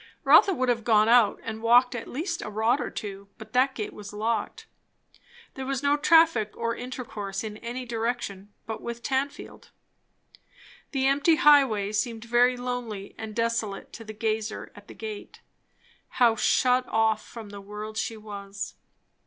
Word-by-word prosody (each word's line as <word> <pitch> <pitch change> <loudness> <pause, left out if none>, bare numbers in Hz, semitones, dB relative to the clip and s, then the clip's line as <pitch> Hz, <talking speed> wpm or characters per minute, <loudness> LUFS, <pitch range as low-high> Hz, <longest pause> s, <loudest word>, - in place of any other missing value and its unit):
Rotha 395 - +7
would 255 -8 0
have 235 -2 +1
gone 215 -1 +4
out, 235 -2 +5
and 220 0 -6
walked 245 +2 +5
at 235 -2 -5
least 335 +6 -3
a - - -5
rod 220 +6 +1
or - - -3
two, 200 -1 -7
but 220 0 -12
that 260 +2 +3
gate 215 - -4
was 205 -1 -9
locked. 220 +2 -2 0.9
There 265 - -6
was 275 0 -2
no 285 0 +4
traffic 320 -7 +4
or 230 0 -1
intercourse 220 -6 -5
in 215 -1 -6
any 245 +3 -6
direction 225 -4 -3
but 220 -1 -5
with 235 0 -6
Tanfield. 270 +1 -3 1.2
The 270 -2 -1
empty 285 +4 +4
highway 265 -10 +4
seemed 225 +1 -2
very 245 +2 +3
lonely 245 -5 -5
and 220 -1 -7
desolate 230 -3 -2
to 230 - -9
the 215 - -8
gazer 220 0 -3
at 205 0 -15
the - - -12
gate. 215 -2 -8 0.8
How 235 -2 +5
shut 250 +2 +2
off 220 -1 +1
from 225 -3 -10
the 200 0 -9
world 210 +2 -7
she 225 0 -3
was! 200 -1 -7
230 Hz, 160 wpm, -26 LUFS, 215-250 Hz, 1.2 s, Rotha